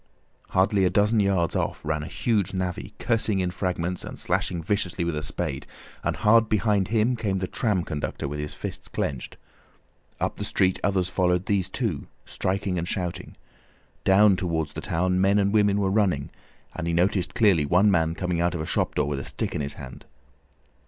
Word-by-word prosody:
Hardly 95 +1 +2
a 90 - +4
dozen 105 +3 +3
yards 95 -4 +1
off - - -2
ran 75 0 -1
a 75 - -6
huge 105 -6 0
navvy, 90 -1 -3
cursing 110 -3 +1
in 90 -1 0
fragments 90 -1 -2
and - - -7
slashing 85 -2 -1
viciously 90 -1 -1
with 85 -2 -1
a 75 - -2
spade, - - -3 0.4
and - - 0
hard 110 +1 +4
behind 105 -3 +2
him 115 +3 +2
came 105 -4 -1
the 95 - -1
tram 100 -2 0
conductor 75 -3 -4
with 75 +1 -5
his 75 0 -5
fists - - -6
clenched. 65 -3 -4 0.8
Up - - -2
the - - -4
street 95 -1 +1
others 95 -2 +1
followed 90 -1 +1
these 95 -2 +1
two, 100 - -3 0.2
striking 95 -1 -2
and 85 - -3
shouting. 90 0 -4 0.7
Down 100 +1 +5
towards 80 -5 -2
the - - -5
town, 90 +2 0
men 100 +1 +4
and 100 0 +2
women 105 -1 +3
were 95 -1 +1
running, 95 -9 +1 0.4
and 85 - -4
he 85 - 0
noticed 90 +1 +1
clearly 90 -10 +4
one 95 +7 +4
man 80 -2 +1
coming 90 -1 -1
out 85 0 +1
of 80 - -3
a - - -3
shop - - 0
door - - +1
with 70 -2 -2
a - - -5
stick - - -3
in - - -2
his 70 0 -3
hand. 65 -2 -10
95 Hz, 195 wpm, -25 LUFS, 85-100 Hz, 0.8 s, Down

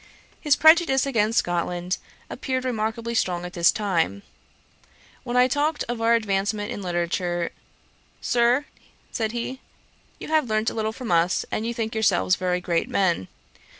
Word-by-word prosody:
His 295 -2 +3
prejudice 315 -4 +5
against 225 -4 +1
Scotland 175 +1 -1 0.3
appeared 260 -1 -3
remarkably 230 -1 -2
strong 180 -6 0
at 180 - -8
this 170 -1 +4
time. 170 - -1 1.0
When 240 +1 -2
I 250 0 +6
talked 290 +3 0
of 240 -1 -4
our 230 +1 +4
advancement 205 0 -1
in 205 - -5
literature, 175 -1 -2 0.7
'Sir, 245 +4 +2 0.5
(said 220 -2 -2
he,) 240 +3 -5 0.6
you - - -8
have 310 -6 +2
learnt 215 +1 +1
a - - -8
little 220 -1 -1
from 240 -1 -6
us, 170 +2 +2
and 220 - -2
you 235 - -2
think 225 -1 -3
yourselves 195 -4 +2
very 180 -1 -1
great 170 -2 -1
men. 175 - +1
220 Hz, 150 wpm, -24 LUFS, 180-245 Hz, 1.0 s, I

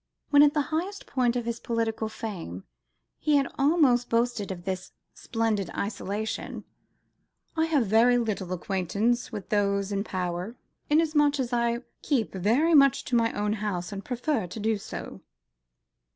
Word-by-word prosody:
When 290 -1 +7
at 295 +1 +5
the 295 - +3
highest 375 +6 -2
of 245 -2 +1
his 230 0 -3
political 225 -1 -1
fame, 170 - -6 0.6
he 300 - +2
had 275 -1 +3
almost 275 -5 +3
boasted 230 -3 0
himself 190 -2 -4
of - - -23
this 185 -1 -4 0.2
"splendid 225 -5 -1
isolation," 210 +1 -3 0.9
"I 320 0 +2
have 295 -7 +2
very 230 +4 +5
little 210 -6 -2
acquaintance 200 +7 -1
with 205 -5 -7
those 200 -1 +1
in 200 0 0
power, 180 +2 -3 0.3
inasmuch 295 -2 +3
as 250 -2 -2
I 235 0 +1 0.2
keep 255 -8 0
very 235 - +2
much 275 -3 +5
to 250 - -1
my 230 -1 +3
own 210 0 0
house, 205 -4 -3
and 200 -1 -6
prefer 245 -3 -1
to 200 - -7
do 215 0 0
so." - - -8
230 Hz, 150 wpm, -27 LUFS, 200-260 Hz, 0.9 s, When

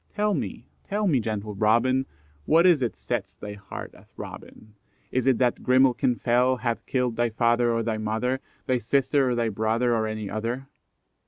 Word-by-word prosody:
"Tell 210 0 +1
me, - - -4 0.2
tell 210 +1 -1
me, 150 -9 +3
gentle 105 -2 -3
Robin, 120 +6 +2 0.4
What 165 +3 +5
is 170 -6 +5
it 120 -3 -1
sets - - -4
thy 105 0 -7
heart 100 -1 -8
a - - -17
throbbing? 110 -1 -11 0.4
Is 130 0 0
it 130 -3 +4
that 125 -2 +1
Grimalkin 125 -1 +3
fell 125 +2 +2
Hath 120 -3 -2
killed 125 -3 0
thy 120 0 +2
father 120 +1 +2
or 115 0 0
thy 110 -1 -2
mother, 110 +5 -1 0.3
Thy 130 -2 +1
sister 135 +3 +2
or 125 - 0
thy 115 -1 0
brother, 110 +3 +1
Or 110 -1 0
any 110 -1 -4
other? 115 +6 -3
120 Hz, 180 wpm, -25 LUFS, 110-130 Hz, 0.4 s, What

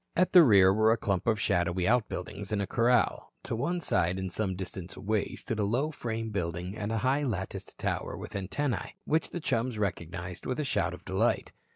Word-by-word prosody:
At 185 +1 +2
the 180 - +10
rear 100 - +7
were 110 +2 +4
a 115 - +3
clump 100 -3 -1
of 110 -2 +3
shadowy 90 -3 +1
outbuildings 105 -3 -1
and 105 - +1
a 100 - 0
corral. 120 +4 +2
To - - -3
one 175 +10 -1
side 90 - +1
and 95 -1 -4
some 95 -4 -1
distance 95 -1 -6
away 105 0 -1
stood 115 - -4
a - - +2
low 125 +10 +1
frame 115 -5 -4
building 90 0 -3
and 105 0 -3
a 115 - 0
high, 135 +3 +3
latticed 100 -8 -4
tower - - -2
with - - -8
antennae, 115 +8 -2
which 160 +2 +1
the 175 - -4
chums 120 -5 -1
recognized 90 -3 -4
with 130 - -2
a 150 - 0
shout - - 0
of - - -18
delight. - - +1
105 Hz, 205 wpm, -29 LUFS, 95-120 Hz, -, the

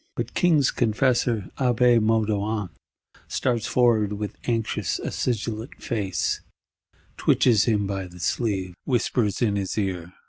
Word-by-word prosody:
But - - -4
King's 160 -7 +3
Confessor 120 -2 +1
Abbé 125 -2 +4
Moudon 110 -2 0 0.6
starts 120 -4 -1
forward; 115 -5 +3
with 105 0 -4
anxious 115 -2 -1
acidulent 115 0 -3
face, 100 -7 -2 0.8
twitches 115 -5 +3
him 105 -3 +1
by 95 -1 -3
the 90 0 -14
sleeve; 95 -2 -1
whispers 120 -4 0
in 105 -3 +1
his 95 0 -3
ear. 90 -4 -2
110 Hz, 115 wpm, -24 LUFS, 100-120 Hz, 0.8 s, Abbé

